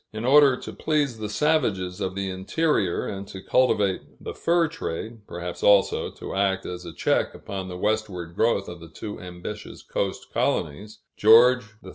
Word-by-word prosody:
In 110 Hz, +2 st, -5 dB
order 140 Hz, -1 st, +6 dB
to -, -, -8 dB
please 145 Hz, -7 st, 0 dB
the 105 Hz, -1 st, -4 dB
savages 105 Hz, -, 0 dB
of 95 Hz, -1 st, -2 dB
the 100 Hz, 0 st, -2 dB
interior, 95 Hz, -, 0 dB
and 100 Hz, 0 st, -5 dB
to 95 Hz, -, -8 dB
cultivate 105 Hz, -4 st, +2 dB, 0.2 s
the -, -, -6 dB
fur 170 Hz, 0 st, +2 dB
trade, 110 Hz, -, -6 dB
perhaps 85 Hz, 0 st, -6 dB
also, 100 Hz, -1 st, +4 dB
to -, -, -8 dB
act 95 Hz, -1 st, 0 dB
as 90 Hz, 0 st, -6 dB
a 85 Hz, -, -7 dB
check -, -, 0 dB
upon 95 Hz, -1 st, -6 dB
the 90 Hz, -1 st, -6 dB
westward 95 Hz, -5 st, -2 dB
growth 105 Hz, -2 st, +1 dB
of 85 Hz, 0 st, -8 dB
the 85 Hz, 0 st, -12 dB
too 105 Hz, +6 st, -7 dB
ambitious 90 Hz, +4 st, -8 dB
coast -, -, -4 dB
colonies, 105 Hz, +9 st, -2 dB, 0.2 s
King -, -, -18 dB
George 125 Hz, +2 st, +7 dB, 0.2 s
III. -, -, -8 dB
100 Hz, 175 wpm, -25 LUFS, 95-120 Hz, 0.2 s, George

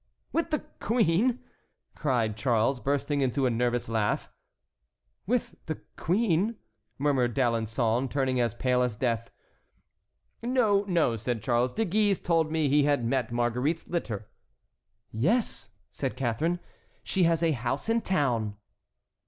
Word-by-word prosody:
"With 330 Hz, 0 st, 0 dB
the 305 Hz, -2 st, -1 dB
queen!" 230 Hz, +2 st, +2 dB, 0.5 s
cried 120 Hz, -7 st, 0 dB
Charles, 120 Hz, +2 st, +1 dB
bursting 140 Hz, +2 st, 0 dB
into 135 Hz, +1 st, +1 dB
a 125 Hz, -, +2 dB
nervous 120 Hz, +1 st, 0 dB
laugh. 110 Hz, -2 st, -1 dB, 1.0 s
"With 245 Hz, +2 st, -1 dB
the 155 Hz, -, -3 dB, 0.2 s
queen," 195 Hz, +3 st, +1 dB, 0.4 s
murmured 130 Hz, -5 st, +1 dB
D'Alençon, 115 Hz, 0 st, +1 dB
turning 130 Hz, -2 st, +1 dB
as 120 Hz, -1 st, 0 dB
pale 125 Hz, +1 st, +1 dB
as 125 Hz, -3 st, 0 dB
death. 115 Hz, -1 st, -1 dB, 1.1 s
"No, 230 Hz, -5 st, +2 dB
no," 165 Hz, -, +2 dB
said 115 Hz, 0 st, -3 dB
Charles, 120 Hz, 0 st, +2 dB
"De 225 Hz, -, 0 dB
Guise 205 Hz, +1 st, +2 dB
told 165 Hz, -2 st, +1 dB
me 160 Hz, -2 st, +1 dB
he 145 Hz, +1 st, +4 dB
had 145 Hz, -5 st, +2 dB
met 120 Hz, -1 st, 0 dB
Marguerite's 125 Hz, +7 st, 0 dB
litter." 110 Hz, -, -3 dB, 0.8 s
"Yes," 195 Hz, -, 0 dB, 0.2 s
said -, -, -3 dB
Catharine, 150 Hz, +8 st, 0 dB, 0.4 s
"she 185 Hz, -2 st, +2 dB
has 165 Hz, 0 st, +2 dB
a 165 Hz, -, +3 dB
house 130 Hz, -, -2 dB
in 230 Hz, +1 st, +2 dB
town." 120 Hz, -, 0 dB
135 Hz, 130 wpm, -28 LUFS, 120-170 Hz, 1.1 s, he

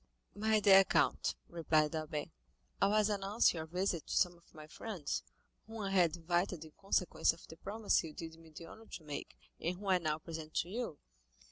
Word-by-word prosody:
"My 220 Hz, +1 st, +2 dB
dear 195 Hz, -2 st, +8 dB
count," -, -, +2 dB
replied 160 Hz, -2 st, +1 dB
Albert, 155 Hz, 0 st, -3 dB, 0.5 s
"I 195 Hz, -, +6 dB
was 210 Hz, 0 st, +3 dB
announcing 200 Hz, -3 st, +2 dB
your 160 Hz, -, -5 dB
visit 180 Hz, -1 st, -1 dB
to -, -, -2 dB
some 175 Hz, -1 st, +3 dB
of 170 Hz, -, -24 dB
my 155 Hz, -1 st, -9 dB
friends, 175 Hz, -1 st, -4 dB, 0.5 s
whom 225 Hz, 0 st, -8 dB
I 195 Hz, -, -2 dB
had 175 Hz, -4 st, +4 dB
invited 175 Hz, 0 st, -1 dB
in 155 Hz, -, -13 dB
consequence 190 Hz, 0 st, +1 dB
of 165 Hz, -, -14 dB
the 160 Hz, -, -11 dB
promise 210 Hz, +4 st, +1 dB
you 160 Hz, -, -6 dB
did 160 Hz, +1 st, -8 dB
me 165 Hz, -1 st, -15 dB
the 160 Hz, +2 st, -10 dB
honor 220 Hz, +6 st, -13 dB
to 165 Hz, -, -8 dB
make, 145 Hz, -2 st, -6 dB, 0.2 s
and 175 Hz, +2 st, -2 dB
whom 205 Hz, -, -10 dB
I 185 Hz, -1 st, +5 dB
now 155 Hz, -2 st, 0 dB
present 160 Hz, -1 st, -8 dB
to 175 Hz, -, 0 dB
you. 225 Hz, -7 st, -3 dB
175 Hz, 200 wpm, -35 LUFS, 160-195 Hz, 0.5 s, dear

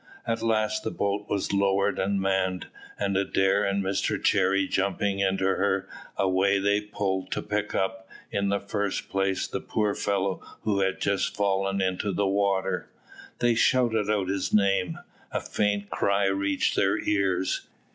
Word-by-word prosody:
At 115 Hz, -1 st, -1 dB
last 110 Hz, -1 st, +1 dB
the -, -, -1 dB
boat 100 Hz, -1 st, -2 dB
was 100 Hz, -1 st, -1 dB
lowered 100 Hz, 0 st, +2 dB
and 100 Hz, +1 st, 0 dB
manned, 95 Hz, -2 st, 0 dB, 0.3 s
and 100 Hz, -1 st, -1 dB
Adair 95 Hz, +1 st, +2 dB
and 100 Hz, 0 st, 0 dB
Mr 95 Hz, 0 st, 0 dB
Cherry 95 Hz, +1 st, +2 dB
jumping 100 Hz, +1 st, 0 dB
into 95 Hz, -1 st, +1 dB
her, 95 Hz, 0 st, +1 dB, 0.3 s
away 95 Hz, +1 st, +2 dB
they 100 Hz, +1 st, +2 dB
pulled 95 Hz, -3 st, -2 dB
to -, -, -2 dB
pick 105 Hz, 0 st, -2 dB
up, 95 Hz, 0 st, -2 dB, 0.2 s
in 100 Hz, 0 st, 0 dB
the 100 Hz, 0 st, +1 dB
first 100 Hz, 0 st, -3 dB
place, 95 Hz, -1 st, 0 dB
the -, -, -4 dB
poor 105 Hz, -2 st, 0 dB
fellow 100 Hz, -2 st, -1 dB, 0.2 s
who 105 Hz, -2 st, 0 dB
had 95 Hz, -1 st, 0 dB
just 100 Hz, -1 st, 0 dB
fallen 95 Hz, -1 st, 0 dB
into 95 Hz, +2 st, -1 dB
the 100 Hz, +2 st, 0 dB
water. 95 Hz, -1 st, 0 dB, 0.5 s
They 120 Hz, -1 st, +3 dB
shouted 115 Hz, -3 st, +2 dB
out 100 Hz, -3 st, +1 dB
his 95 Hz, 0 st, -1 dB
name: 95 Hz, -4 st, +2 dB, 0.3 s
a -, -, -1 dB
faint 100 Hz, -1 st, -1 dB
cry 100 Hz, 0 st, +1 dB
reached 95 Hz, 0 st, +1 dB
their -, -, +2 dB
ears. 95 Hz, -2 st, 0 dB
100 Hz, 155 wpm, -27 LUFS, 95-100 Hz, 0.5 s, They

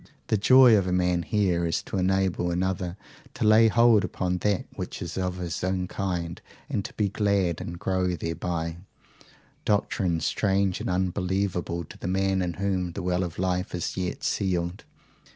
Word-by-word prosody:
The -, -, +3 dB
joy 125 Hz, +3 st, +7 dB
of 95 Hz, -3 st, +2 dB
a -, -, 0 dB
man 90 Hz, -1 st, +2 dB
here 90 Hz, -3 st, +1 dB
is 80 Hz, -, -1 dB
to -, -, -4 dB
enable 95 Hz, -1 st, +1 dB
another 90 Hz, +1 st, -1 dB, 0.4 s
to -, -, -2 dB
lay 110 Hz, +1 st, +7 dB
hold 115 Hz, -1 st, +5 dB
upon 90 Hz, -1 st, -2 dB
that 100 Hz, -1 st, 0 dB
which -, -, -6 dB
is -, -, -5 dB
of 90 Hz, -1 st, -2 dB
his 90 Hz, -2 st, -4 dB
own 95 Hz, 0 st, -1 dB
kind 90 Hz, -3 st, -3 dB, 0.3 s
and 100 Hz, -, -2 dB
be 105 Hz, -, +2 dB
glad 100 Hz, -4 st, 0 dB
and 85 Hz, 0 st, -6 dB
grow 90 Hz, 0 st, 0 dB
thereby 85 Hz, 0 st, -3 dB, 0.9 s
doctrine 95 Hz, -4 st, +1 dB
strange 95 Hz, +3 st, 0 dB
and -, -, -3 dB
unbelievable 90 Hz, -1 st, -1 dB
to -, -, -13 dB
the -, -, -5 dB
man 95 Hz, 0 st, +1 dB
in 90 Hz, -1 st, -1 dB
whom 95 Hz, -2 st, -1 dB
the 95 Hz, -, -5 dB
well 90 Hz, +1 st, +1 dB
of 85 Hz, -2 st, -5 dB
life 90 Hz, 0 st, -1 dB
is 85 Hz, -, -3 dB
yet 90 Hz, -1 st, -3 dB
sealed. 90 Hz, -1 st, -1 dB
90 Hz, 170 wpm, -26 LUFS, 90-100 Hz, 0.9 s, joy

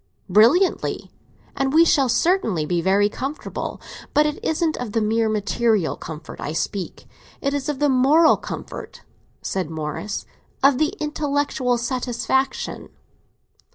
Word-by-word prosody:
"Brilliantly, 235 Hz, -, +3 dB, 0.4 s
and 270 Hz, 0 st, 0 dB
we 330 Hz, +2 st, +6 dB
shall 275 Hz, -5 st, +3 dB
certainly 230 Hz, -, +1 dB
be 175 Hz, +2 st, 0 dB
very 195 Hz, +3 st, +3 dB
comfortable. 270 Hz, +8 st, -5 dB, 0.4 s
But 300 Hz, -, +5 dB
it 300 Hz, 0 st, -3 dB
isn't 320 Hz, 0 st, 0 dB
of 235 Hz, -4 st, -5 dB
the 225 Hz, -, +2 dB
mere 220 Hz, +1 st, +1 dB
material 215 Hz, -2 st, +1 dB
comfort 160 Hz, 0 st, -9 dB
I 150 Hz, -, -3 dB
speak; 185 Hz, +2 st, -4 dB, 0.3 s
it 280 Hz, 0 st, -1 dB
is 285 Hz, 0 st, -2 dB
of 295 Hz, -, -2 dB
the 295 Hz, +2 st, +2 dB
moral 285 Hz, +5 st, +5 dB
comfort," -, -, -8 dB, 0.4 s
said 185 Hz, -5 st, -2 dB
Morris—"of 180 Hz, -, -2 dB
the 310 Hz, -, +1 dB
intellectual 285 Hz, -4 st, 0 dB
satisfaction!" 255 Hz, +2 st, -2 dB
250 Hz, 125 wpm, -22 LUFS, 205-290 Hz, 0.4 s, we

